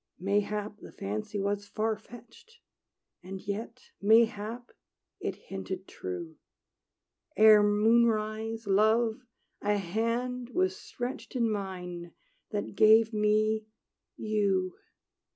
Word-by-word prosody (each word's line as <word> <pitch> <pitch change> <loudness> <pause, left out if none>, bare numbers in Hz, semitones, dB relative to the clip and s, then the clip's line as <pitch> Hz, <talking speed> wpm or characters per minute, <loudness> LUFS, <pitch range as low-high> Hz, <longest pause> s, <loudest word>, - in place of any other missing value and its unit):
Mayhap 205 +2 -1
the - - -11
fancy 105 - -4
was 200 +1 -1
far 220 +2 -1
fetched; 240 - -15 0.6
And 190 +2 -7
yet, 220 +5 -6
mayhap, 225 +2 +2 0.5
it - - -3
hinted - - -7
true. 355 -4 -6 1.0
Ere 215 -1 +8
moonrise, 220 +1 +2
Love, 220 +4 +3 0.4
a 205 0 +1
hand 230 +6 -2
was 370 +1 +2
stretched 255 -5 -6
In 230 -3 +1
mine, 180 -4 -5 0.4
that 205 -2 -3
gave 220 +2 +6
me 215 +1 +2 0.5
you! 200 -4 0
215 Hz, 100 wpm, -29 LUFS, 205-230 Hz, 1.0 s, Ere